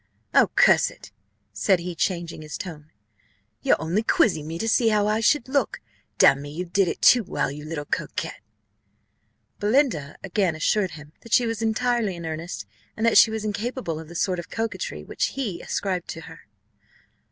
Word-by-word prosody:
Oh, - - +5
curse - - +5
it!" 105 - -14 0.4
said 105 - +3
he, 175 +1 -5
changing 170 -1 -2
his 150 -1 -7
tone, 155 -4 -8 0.7
"you're - - +3
only 175 +7 0
quizzing 220 - +2
me 165 +1 -4
to 225 - -2
see 225 +1 +3
how 210 -1 +2
I 215 +1 +1
should 235 +3 +2
look 280 +1 0 0.4
damn 135 0 +6
me, 145 - -7
you 170 +5 -5
did 185 +2 +1
it - - -4
too 245 -2 +7
well, 155 - -2
you 150 +1 -8
little 155 -2 -5
coquet!" - - -3 1.3
Belinda 210 - +1
again 190 -3 0
assured 185 +4 +1
him 150 0 -13
that 230 - -8
she 245 - +5
was 225 -1 -3
entirely 225 -2 0
in 170 -1 -7
earnest, 160 -6 -5 0.3
and 220 - 0
that 230 - +6
she - - +7
was 220 -1 -4
incapable 210 -5 -3
of 160 - -9
the 170 - -11
sort 180 +1 0
of 175 - -8
coquetry 225 0 -4
which - - -2
he 205 -11 -3
ascribed 185 -3 -2
to 160 - -6
her. 160 -7 -13
185 Hz, 185 wpm, -24 LUFS, 160-225 Hz, 1.3 s, too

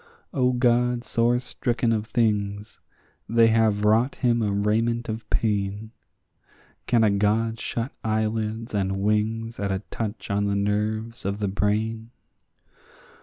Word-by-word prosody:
O 125 -2 +2
God 120 0 +2
sore 120 0 +2
stricken 120 -1 -1
of 110 -1 -1
things! 105 -3 -1 0.5
they 115 0 +5
have 110 -2 +2
wrought 115 +5 +3
him 120 -2 +1
a 105 -2 0
raiment 115 +4 0
of 110 +1 -5
pain; 105 0 -1 1.0
Can 120 -2 +3
a 105 - +4
God 110 +3 +1
shut 120 +3 -3
eyelids 110 +1 -1
and 95 -1 0
wings 110 +2 0
at 100 -1 -1
a 95 +1 -2
touch 110 -2 -4
on 100 +1 +1
the 100 0 0
nerves 105 +3 -1
of 100 +1 -2
the 105 -1 -1
brain? 110 +3 -1
110 Hz, 135 wpm, -25 LUFS, 105-115 Hz, 1.0 s, they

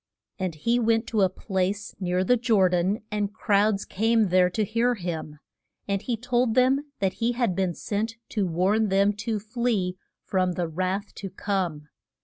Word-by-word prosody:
And 185 -4 -2
he 235 +10 +1
went 225 0 +2
to 220 -3 +1
a 190 - +4
place 190 +2 -2
near 180 -1 0
the 250 +7 +4
Jor 225 -6 +3
dan 185 +5 0
and 205 -1 -1
crowds 205 -1 +1
came 220 0 +2
there 180 0 +4
to 215 +4 -1
hear 230 +4 +1
him. 165 -6 -5 0.5
And 200 -1 0
he 240 -2 -2
told 245 -1 +1
them 265 +3 +3
that 190 -1 0
he 235 +1 +2
had 235 -7 0
been 185 -2 0
sent 220 +2 -3
to 205 -4 0
warn 195 +6 +2
them 200 +2 +3
to 215 +1 -2
flee 215 -4 -1 0.3
from 185 -2 0
the 175 -1 -2
wrath 185 +5 -2
to 195 - -5
come. 180 -6 -3
200 Hz, 175 wpm, -26 LUFS, 185-225 Hz, 0.5 s, a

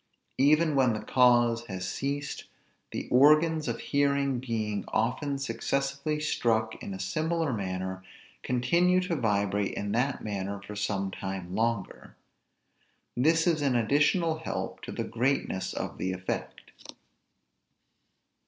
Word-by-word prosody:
Even 155 +3 +4
when 130 -4 +3
the 110 - -3
cause 120 -2 +3
has 95 -2 -4
ceased, 140 +8 -3 0.4
the - - -5
organs 155 +4 +5
of 115 -1 -2
hearing 140 -2 +1
being 110 -5 -2
often 135 +5 -1
successively 140 +2 -2
struck 110 -7 0
in 100 - -5
a - - -8
similar 155 - -1
manner, 95 -2 -3 0.4
continue 170 +9 +2
to 180 -2 -1
vibrate 100 -5 0
in 100 0 -3
that 125 +5 0
manner 100 -1 -3
for 105 +1 -9
some 100 -2 -1
time 95 -2 -5
longer; 115 -2 -2 1.0
this 160 +6 +3
is 165 -4 +2
an 140 -3 +2
additional 150 - +2
help 160 - -4
to - - -7
the - - -3
greatness 120 -6 -1
of - - -5
the 95 0 -1
effect. 95 0 -5
125 Hz, 125 wpm, -28 LUFS, 105-145 Hz, 1.0 s, organs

